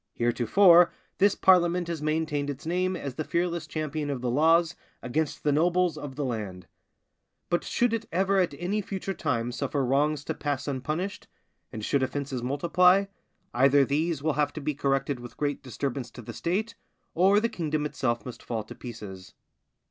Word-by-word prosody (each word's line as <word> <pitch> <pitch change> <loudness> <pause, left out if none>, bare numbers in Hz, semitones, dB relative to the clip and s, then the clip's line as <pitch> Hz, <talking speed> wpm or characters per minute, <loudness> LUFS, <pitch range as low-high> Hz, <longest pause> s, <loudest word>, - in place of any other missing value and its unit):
Heretofore 170 - +5 0.3
this 200 +1 +4
parliament 180 -2 +4
has 170 -3 -4
maintained 155 -2 -1
its 140 +1 -6
name 185 +2 0
as 140 -2 -5
the 155 - -3
fearless 170 -1 -1
champion 155 -1 -3
of 135 -3 -3
the 125 -1 -1
laws 165 +5 +3 0.3
against 150 +5 -2
the 150 - +2
nobles 175 +2 +2
of 145 -3 -7
the 145 0 -2
land; 105 -7 -4 0.9
but 175 - +1
should 240 -1 +1
it 230 0 -2
ever 195 +2 +2
at 175 -6 +1
any 195 +5 -1
future 195 0 -4
time 125 -8 -1
suffer 135 +2 -1
wrongs 145 +3 +1
to - - -2
pass 145 -2 -3
unpunished, 155 +8 -3 0.4
and 110 -1 -5
should 140 - +1
offences 135 -1 -2
multiply, 180 +9 +3 0.5
either 135 +2 +5
these 150 +1 -1
will 155 -1 +1
have 145 0 +1
to - - -5
be 150 +1 -2
corrected 135 -1 0
with 120 0 -11
great 145 -1 -1
disturbance 130 0 -4
to 120 - -11
the 115 - -8
State, 200 - -2 0.4
or 195 +4 +4
the 230 - +1
kingdom 155 -8 -2
itself 120 -5 -2
must 125 - -8
fall 115 -2 -3
to 105 - -10
pieces. 105 -6 -9
150 Hz, 175 wpm, -27 LUFS, 130-175 Hz, 0.9 s, Heretofore